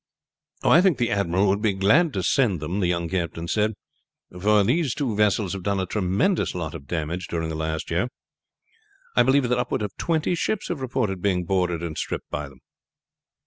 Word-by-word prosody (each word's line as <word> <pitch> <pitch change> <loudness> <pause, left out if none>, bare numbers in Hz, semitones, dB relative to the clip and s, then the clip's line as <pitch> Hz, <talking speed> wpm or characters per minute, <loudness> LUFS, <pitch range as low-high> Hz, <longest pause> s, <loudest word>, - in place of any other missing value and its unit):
"I 170 - +6
think 185 -7 +3
the 120 -1 0
admiral 100 0 +1
would 100 +2 +1
be 105 -2 +2
glad 120 - +3
to 95 - -2
send 110 - +2
them," 80 +7 -3
the 90 - +1
younger 85 +1 0
captain 85 0 -5
said; 105 +3 +1 0.7
"for 105 +1 +4
these 135 - +1
two 125 -7 -1
vessels 105 -2 +2
have 95 - -5
done 100 +1 0
a 95 - 0
tremendous 100 - 0
lot 80 -4 -4
of 70 -4 -9
damage 85 +2 -3
during 80 -1 -2
the 80 - -4
last 80 0 -3
year. 90 +8 +1 1.1
I - - +6
believe 130 -1 +3
that 125 0 +1
upward 115 - -1
of 100 -2 -5
twenty 165 0 0
ships 195 +4 -1
have 165 -6 -3
reported 110 -7 -1
being 90 -3 +1
boarded 90 -2 0
and 80 -2 -4
stripped - - -4
by 75 -1 -4
them." 65 -2 -19
95 Hz, 195 wpm, -24 LUFS, 85-120 Hz, 1.1 s, I